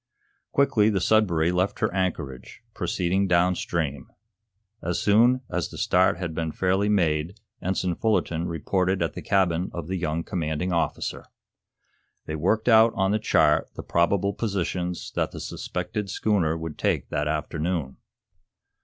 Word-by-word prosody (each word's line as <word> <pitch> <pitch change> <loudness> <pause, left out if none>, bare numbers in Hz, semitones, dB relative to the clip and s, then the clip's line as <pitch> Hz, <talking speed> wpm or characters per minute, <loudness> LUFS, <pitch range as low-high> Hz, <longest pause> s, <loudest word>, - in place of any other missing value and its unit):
Quickly 135 -7 +3
the 100 -3 +1
"Sudbury" 90 -6 +2
left 90 +2 0
her - - 0
anchorage, 80 -9 -3
proceeding 95 +2 0
downstream. 85 -5 0 0.7
As 85 +1 -1
soon 120 +5 +4
as - - -2
the - - -10
start 90 -1 +3
had 85 -2 -4
been 80 0 -2
fairly 95 +4 +1
made 85 -1 +1 0.2
Ensign 90 -1 -1
Fullerton 85 -5 0
reported 90 +2 0
at 85 - -2
the - - -6
cabin 90 -3 +1
of 85 -3 -4
the 95 +1 -2
young 85 -1 -2
commanding 80 +1 -2
officer. 85 - -2 1.0
They 80 - -4
worked 105 +9 0
out 115 -1 +6
on 95 -2 +1
the 105 - +1
chart 110 - +3
the - - -6
probable 100 +4 +1
positions 90 -4 -3
that - - 0
the - - -9
suspected 95 +3 -4
schooner 90 -6 +1
would 80 -2 -7
take - - 0
that 75 0 -1
afternoon. 75 -1 -2
90 Hz, 145 wpm, -25 LUFS, 80-100 Hz, 1.0 s, out